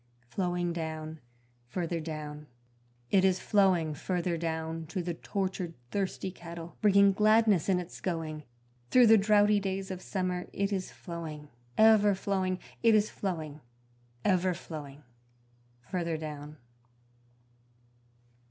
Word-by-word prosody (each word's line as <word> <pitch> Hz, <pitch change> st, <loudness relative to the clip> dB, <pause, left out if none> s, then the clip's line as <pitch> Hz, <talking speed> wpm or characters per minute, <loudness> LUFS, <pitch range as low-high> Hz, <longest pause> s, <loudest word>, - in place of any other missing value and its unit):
Flowing 175 Hz, +1 st, -1 dB
down, 160 Hz, -1 st, -5 dB, 0.5 s
further 170 Hz, +5 st, -2 dB
down; 150 Hz, -2 st, -6 dB, 0.6 s
It 190 Hz, -1 st, +5 dB
is 190 Hz, -1 st, +3 dB
flowing 185 Hz, -6 st, +3 dB
further 175 Hz, +2 st, -1 dB
down 160 Hz, -1 st, -3 dB
To 180 Hz, +2 st, -3 dB
the 175 Hz, 0 st, -2 dB
tortured 185 Hz, -1 st, -3 dB, 0.2 s
thirsty 190 Hz, -1 st, -2 dB
cattle, 170 Hz, -1 st, -9 dB
bringing 200 Hz, -1 st, +6 dB
gladness 215 Hz, -3 st, +4 dB
in 185 Hz, -, +4 dB
its 180 Hz, -1 st, -6 dB
going; 160 Hz, -4 st, -3 dB, 0.5 s
Through 250 Hz, -1 st, +7 dB
the 225 Hz, 0 st, +8 dB
droughty 205 Hz, 0 st, +4 dB
days 195 Hz, -1 st, -3 dB
of 185 Hz, -1 st, -5 dB
summer 180 Hz, -2 st, -2 dB
it 200 Hz, +1 st, 0 dB
is 190 Hz, -2 st, -3 dB
flowing, 160 Hz, -4 st, -7 dB, 0.3 s
ever 215 Hz, -2 st, +6 dB
flowing 190 Hz, -1 st, -1 dB, 0.2 s
It 230 Hz, -2 st, +5 dB
is 215 Hz, 0 st, +2 dB
flowing, 155 Hz, -6 st, -4 dB, 0.6 s
ever 185 Hz, -2 st, +2 dB
flowing, 150 Hz, -4 st, -8 dB, 0.8 s
further 170 Hz, +3 st, -2 dB
down. 150 Hz, -1 st, -7 dB
180 Hz, 120 wpm, -30 LUFS, 160-195 Hz, 0.8 s, the